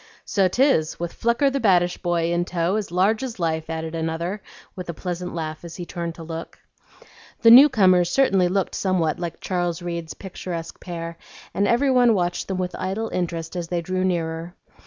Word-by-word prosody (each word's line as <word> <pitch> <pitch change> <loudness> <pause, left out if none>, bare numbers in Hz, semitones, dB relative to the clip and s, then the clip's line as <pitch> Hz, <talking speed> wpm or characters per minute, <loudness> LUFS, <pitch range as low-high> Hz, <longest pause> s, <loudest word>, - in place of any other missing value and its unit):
"So 195 -3 +2
'tis, 185 - +2
with 175 0 -4
'Flucker, 240 +4 +1
the 275 - 0
baddish 180 -6 +3
boy,' 170 -1 0
in 175 0 +1
tow, 175 +1 -1
as 215 -2 -2
large 195 +6 +2
as 255 -4 -5
life," 160 -1 -1
added 160 0 -4
another, 165 +4 -3 0.3
with 180 -2 -7
a 170 - -4
pleasant 180 0 -5
laugh 155 -1 -5
as 170 -1 -8
he 175 - -6
turned 170 -1 -5
to 165 - -9
look. 165 0 -7 0.9
The 230 - +8
new 270 +5 +10
comers 185 -6 +4
certainly 195 -7 +3
looked 190 +1 -1
somewhat 175 -5 0
like 170 -2 -5
Charles 175 -2 -2
Reade's 170 -2 -5
picturesque 175 -3 -7
pair, 170 -2 -6 0.3
and 200 +1 +1
every 265 +4 +3
one 245 -3 +5
watched 175 -2 -1
them 190 - -2
with 180 -1 -3
idle 215 +4 -2
interest 170 -2 -3
as 175 -2 -3
they 175 0 -1
drew 185 +2 -1
nearer. 170 -1 -2
175 Hz, 190 wpm, -23 LUFS, 170-195 Hz, 0.9 s, new